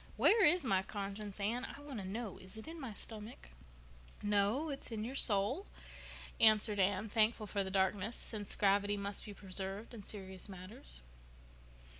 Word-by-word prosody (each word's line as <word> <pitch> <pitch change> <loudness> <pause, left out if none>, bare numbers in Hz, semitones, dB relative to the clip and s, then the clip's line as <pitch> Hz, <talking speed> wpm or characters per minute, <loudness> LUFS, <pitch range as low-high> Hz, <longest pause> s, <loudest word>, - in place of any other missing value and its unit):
Where 435 -1 +6
is 340 -1 +5
my 190 -6 +3
conscience, 200 +1 -5
Anne? 230 +5 0
I 275 - -7
want 290 -5 -6
to 195 - -5
know. 220 +1 -4
Is 190 +3 -12
it 220 - -9
in 325 0 -7
my 260 -4 -4
stomach?" 215 - -7 0.7
"No, 210 +9 +3
it's 275 -3 -4
in 215 -2 -2
your 245 +4 -4
soul," 235 - +3 0.7
answered 215 -1 +5
Anne, 195 +2 +2
thankful 220 +1 +2
for 200 0 0
the 190 - -4
darkness, 195 +3 +1
since 210 -3 -3
gravity 205 0 +3
must 200 0 -4
be 210 - -7
preserved 195 +3 -4
in 225 - -7
serious 190 -1 -5
matters. 190 - -10
210 Hz, 165 wpm, -36 LUFS, 195-235 Hz, 0.7 s, Where